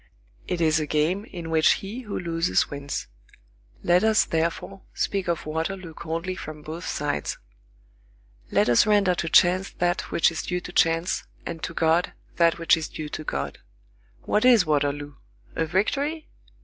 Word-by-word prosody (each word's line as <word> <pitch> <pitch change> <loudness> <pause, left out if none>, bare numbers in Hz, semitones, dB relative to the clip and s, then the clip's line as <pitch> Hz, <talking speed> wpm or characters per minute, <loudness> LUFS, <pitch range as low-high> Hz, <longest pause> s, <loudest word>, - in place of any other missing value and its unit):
It 175 - -2
is 160 -1 +3
a 155 - -2
game 160 +8 0
in 170 -6 -7
which 160 0 +5
he 205 +5 -6
who 210 -5 -5
loses 170 0 0
wins. 140 0 -4 0.8
Let 175 +2 +4
us, 220 -1 +4
therefore, 170 +4 -2
speak 195 -2 -1
of 170 -2 -1
Waterloo 165 +2 -3
coldly 165 +3 -4
from 155 -4 -8
both 160 +4 -6
sides. 110 - -2 1.1
Let - - +2
us 120 - +5
render 205 -3 +4
to 170 -2 -2
chance 185 +4 +4
that 175 0 -1
which 165 - +3
is 160 - -3
due 180 0 -2
to 180 - -8
chance, 165 0 +1 0.2
and 165 -1 -5
to 165 - -5
God 165 +2 +2 0.2
that 170 -1 +4
which 165 -1 +4
is 160 -1 -5
due 155 -1 -6
to 155 - -5
God. 70 - -4 0.6
What 210 - +1
is 240 -7 +6
Waterloo? 145 -1 -1 0.4
A 165 - 0
victory? 285 - -1
170 Hz, 160 wpm, -25 LUFS, 155-185 Hz, 1.1 s, is